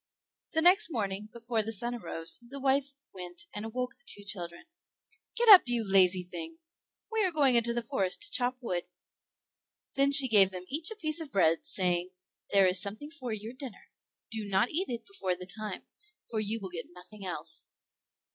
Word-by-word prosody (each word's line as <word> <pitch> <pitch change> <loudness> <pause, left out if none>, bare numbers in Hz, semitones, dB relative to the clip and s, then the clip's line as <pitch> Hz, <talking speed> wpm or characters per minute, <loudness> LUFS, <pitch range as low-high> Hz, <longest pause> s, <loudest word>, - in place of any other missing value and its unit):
The 320 0 +2
next 360 +3 +6
morning, 210 - -3
before 230 -1 -2
the 220 +1 -5
sun 235 +3 -1
arose, 165 -8 -3
the 275 +1 -7
wife 275 +1 0 0.2
went 180 - -8
and 210 - -5
awoke 250 +3 -4
the 485 - -19
two 205 - -7
children. 175 -4 -6 0.7
"Get 475 - +1
up, 400 -4 +11
you 240 -1 -1
lazy 185 -1 +4
things; 325 - -9 0.4
we 445 -1 +1
are 375 - +2
going 285 -5 +4
into 235 0 +4
the 235 0 -2
forest 210 - -1
to 415 - -7
chop 250 0 0
wood." 175 -6 -3 1.1
Then 275 +1 +3
she 275 -1 +10
gave 205 -5 +5
them 185 -1 -8
each 315 +3 -1
a 440 - -7
piece 315 -5 -3
of 315 - -7
bread, 165 -4 +2
saying, 180 -1 -1 0.4
"There 195 -1 +4
is 185 0 +5
something 220 +10 -6
for 260 -7 -6
your 215 +2 -6
dinner; 260 -4 -10 0.4
do 220 -1 -4
not 195 +4 +2
eat 360 +5 -1
it 235 -2 -5
before 275 - -3
the 180 +1 -9
time, 215 +3 -7 0.5
for 220 - -1
you 215 +2 -2
will 195 -3 -7
get 165 -2 -7
nothing 180 +4 -13
else." 165 -3 -3
225 Hz, 190 wpm, -30 LUFS, 190-280 Hz, 1.1 s, up